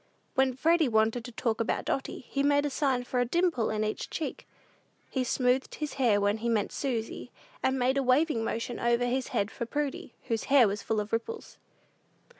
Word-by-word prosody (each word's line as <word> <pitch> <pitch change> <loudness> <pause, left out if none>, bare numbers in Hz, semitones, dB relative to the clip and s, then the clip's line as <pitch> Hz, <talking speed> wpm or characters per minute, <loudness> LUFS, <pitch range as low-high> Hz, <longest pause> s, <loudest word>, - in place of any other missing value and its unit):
When 265 -2 +2
Freddy 325 +3 +3
wanted 225 +1 +2
to 245 - -7
talk 225 -1 -1
about 230 - -1
Dotty, 270 -1 -3
he 275 - -1
made 285 +1 +3
a 290 - -1
sign 265 -3 +1
for 250 0 -2
a - - +4
dimple 335 -3 +1
in 215 0 -1
each 215 0 -3
cheek. 320 - -5 0.6
He 260 - 0
smoothed 250 +1 +1
his 300 -1 -4
hair 220 -5 +4
when 205 +1 +1
he 235 +2 -1
meant 215 -3 +1
Susy, 245 -3 -3 0.3
and 265 0 +1
made 260 +2 +2
a - - 0
waving 255 -1 +2
motion 230 +2 -3
over 235 +1 +2
his 255 +1 -1
head 200 +2 -1
for 235 - -5
Prudy, 290 -2 -3
whose 225 -1 -2
hair 270 -5 +6
was 200 +1 -2
full 220 +1 -1
of 210 +1 -5
ripples. 445 - -4
245 Hz, 200 wpm, -29 LUFS, 225-275 Hz, 0.6 s, hair